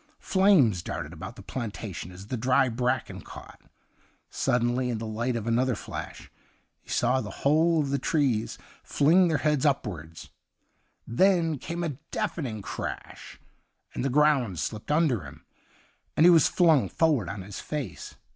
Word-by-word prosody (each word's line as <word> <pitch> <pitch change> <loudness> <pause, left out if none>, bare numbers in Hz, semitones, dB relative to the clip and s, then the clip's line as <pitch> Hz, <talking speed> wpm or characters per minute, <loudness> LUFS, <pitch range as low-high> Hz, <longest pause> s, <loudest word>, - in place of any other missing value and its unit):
Flames 180 - +3
darted 85 -2 -5
about 95 +7 -8
the - - -12
planta 110 -4 -5
tion 90 - -7
as 95 +2 -11
the 115 - -4
dry 125 +2 +2
bracken 125 +2 -2
caught. - - -12 0.7
Suddenly, 125 0 0
in 120 - -1
the 115 - -5
light 115 +3 -2
of 115 -2 -3
another 120 +2 +1
flashj - - -8 0.5
he - - -23
saw 125 +2 +1
the - - -6 0.2
whole 160 +3 +4
of 140 -2 -1
the 140 - 0
trees 130 -7 0 0.3
fling 175 +6 +4
their 160 -3 +1
heads 150 -3 +1
upwards; 90 - -2 0.7
then 165 +2 +2
came 170 +5 -4
a 145 -5 -4
deafening 115 - -3
crash, - - -7 0.5
and - - -3
the 135 - +1
ground 135 - +2
slipped 105 - -4
under 150 - +2
him, 65 - -12 0.7
and 160 - +6
he 180 - +9
was 165 -3 +6
flung 160 -7 +3
forward 145 - +1
on 100 -1 -6
his 100 +1 -8
face. 140 - -6
125 Hz, 155 wpm, -27 LUFS, 110-150 Hz, 0.7 s, he